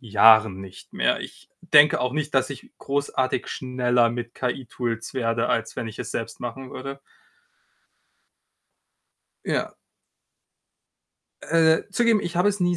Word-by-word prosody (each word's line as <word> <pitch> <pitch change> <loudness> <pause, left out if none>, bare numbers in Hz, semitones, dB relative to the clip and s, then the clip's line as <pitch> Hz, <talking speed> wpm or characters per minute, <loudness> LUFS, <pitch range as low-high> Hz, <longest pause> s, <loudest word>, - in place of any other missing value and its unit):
Jahren 110 -3 +5
nicht 95 -1 -13
mehr. - - +1
Ich - - -11
denke 150 -3 +5
auch 125 0 -1
nicht, 150 -2 -3
dass 130 0 +2
ich 135 - -10
großartig 140 -2 -1
schneller 125 -2 +1
mit 120 0 -5
KI-Tools 120 -2 -4
werde, 115 -3 -1
als 115 0 -1
wenn 115 - -3
ich 110 - -9
es - - -5
selbst 115 -1 -5
machen 130 +2 -6
würde. 135 +1 -7 2.4
Ja. - - -2 1.7
Äh, 160 -1 +3
zugegeben, 230 0 +3
ich 175 -2 -5
habe 180 +4 +3
es 205 -1 -2
nie 175 0 +1
130 Hz, 130 wpm, -24 LUFS, 115-150 Hz, 2.4 s, Jahren